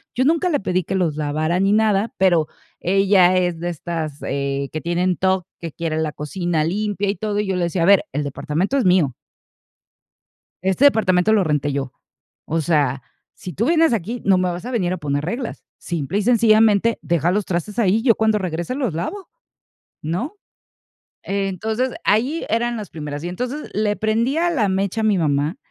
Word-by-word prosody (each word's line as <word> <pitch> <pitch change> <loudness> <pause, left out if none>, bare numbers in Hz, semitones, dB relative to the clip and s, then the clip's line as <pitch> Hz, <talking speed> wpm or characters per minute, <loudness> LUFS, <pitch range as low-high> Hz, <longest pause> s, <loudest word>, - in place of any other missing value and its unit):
Yo 255 - +2
nunca 330 +5 +2
le 290 -9 0
pedí 185 -1 0
que - - -3
los 165 -5 0
lavara 155 +4 0
ni 195 +1 +3
nada, 215 0 +2
pero 175 -5 +3 0.3
ella 190 -1 +4
es 175 -2 0
de 175 - -3
estas, 160 -3 -4
eh, 140 0 -2
que 155 - -3
tienen 175 +1 0
TOC, 190 -1 +1
que 165 -2 -6
quiere 165 -2 -3
la 155 -2 -1
cocina 155 +2 -2
limpia 205 +3 -1
y 200 - 0
todo, 210 -1 -2
y 210 - -4
yo 190 - -1
le 175 - 0
decía: 170 0 -1
A - - +3
ver, 200 0 +5
el 145 +1 -1
departamento 150 - -2
es 250 - +1
mío" 175 -9 +3 1.5
"este 190 +8 +1
departamento 215 -5 +3
lo 205 -3 +3
renté 150 -2 0
yo. 135 -2 -3 0.5
O 165 +1 -1
sea, 140 -5 +1 0.3
si 180 - -9
tú 225 - 0
vienes 325 -5 +4
aquí, 230 +4 -3
no 195 -2 +4
me 180 0 +1
vas 175 +6 -5
a 255 - -4
venir 185 -7 0
a - - -3
poner 145 -2 -2
reglas. 235 +7 -4
Simple 170 +2 -3
y - - 0
sencillamente, 225 -1 +4
deja 170 0 +1
los 205 0 0
trastes 190 +6 -3
ahí 205 -1 +3
y 225 - -1
yo, 235 -4 +5
cuando 220 -1 +2
regrese, 175 +4 -3
los 255 - -1
lavo, 345 - -5 0.7
¿no?". 185 - -3 0.9
Entonces, 200 +6 -2
ahí 250 +10 +1
eran 235 +1 0
las 210 - -7
primeras. 150 -1 -6
Y, 175 - -3
entonces, 250 +10 -5
le 210 0 0
prendía 240 +10 +1
la 230 - +1
mecha 195 +3 -1
a - - 0
mi 205 -3 +3
mamá, 150 +1 0
185 Hz, 190 wpm, -21 LUFS, 165-220 Hz, 1.5 s, ver